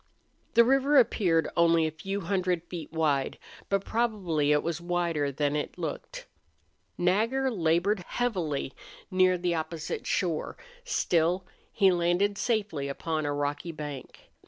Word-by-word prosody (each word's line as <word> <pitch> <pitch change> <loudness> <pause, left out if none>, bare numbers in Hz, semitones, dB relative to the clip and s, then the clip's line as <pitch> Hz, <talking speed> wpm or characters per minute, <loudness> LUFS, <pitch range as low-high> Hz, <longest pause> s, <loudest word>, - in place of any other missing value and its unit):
The 235 - +8
river 270 +3 +4
appeared 175 - +3
only 170 -1 +4
a 155 - -1
few 195 +6 -4
hundred 180 -2 0
feet 170 -4 -8
wide, 150 -4 0 0.3
but 195 0 0
probably 190 -11 0
it 150 0 +3
was 170 0 -3
wider 170 -5 0
than 145 +1 0
it 150 - -3
looked. - - -5 0.7
Nagger 225 +9 +1
labored 180 +1 +1
heavily 175 - -2 0.4
near 185 0 +4
the 175 0 0
opposite 160 0 -4
shore; 170 -4 -1 0.3
still, 175 +2 +1 0.3
he 195 -2 +4
landed 180 +4 +1
safely 205 - -1
upon 155 +2 -2
a - - 0
rocky 145 +3 -2
bank. 150 -4 -8
175 Hz, 135 wpm, -28 LUFS, 155-195 Hz, 0.7 s, The